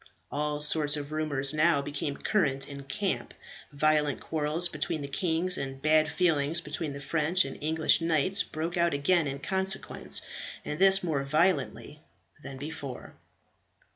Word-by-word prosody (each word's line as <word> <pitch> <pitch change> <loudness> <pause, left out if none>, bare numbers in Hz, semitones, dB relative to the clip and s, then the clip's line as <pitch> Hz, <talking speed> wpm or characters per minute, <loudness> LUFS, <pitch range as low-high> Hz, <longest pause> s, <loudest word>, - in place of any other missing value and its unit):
All 150 0 -2
sorts 150 0 +2
of 145 0 -6
rumours 150 -3 0
now 155 0 +3
became 145 0 -4
current 140 -10 0
in 140 -1 -9
camp; 135 - -3 0.4
violent 150 -1 +1
quarrels 155 +2 -1
between 150 -2 -3
the - - -4
kings, 170 +4 0
and 135 -1 -5
bad 155 +2 +3
feeling 155 -3 +1
between 150 0 -3
the 140 - -7
French 165 +5 +1
and 135 - -6
English 160 +2 +3
knights, 165 +4 +2
broke 165 +3 -4
out 170 -3 +2
again 155 +3 +2
in 135 0 -4
consequence, 190 +6 +1 0.4
and 150 - -4
this 195 0 +6
more 155 -5 -1
violently 150 0 0 0.4
than 140 -2 -9
before. 145 -2 -7
150 Hz, 145 wpm, -28 LUFS, 140-165 Hz, 0.4 s, this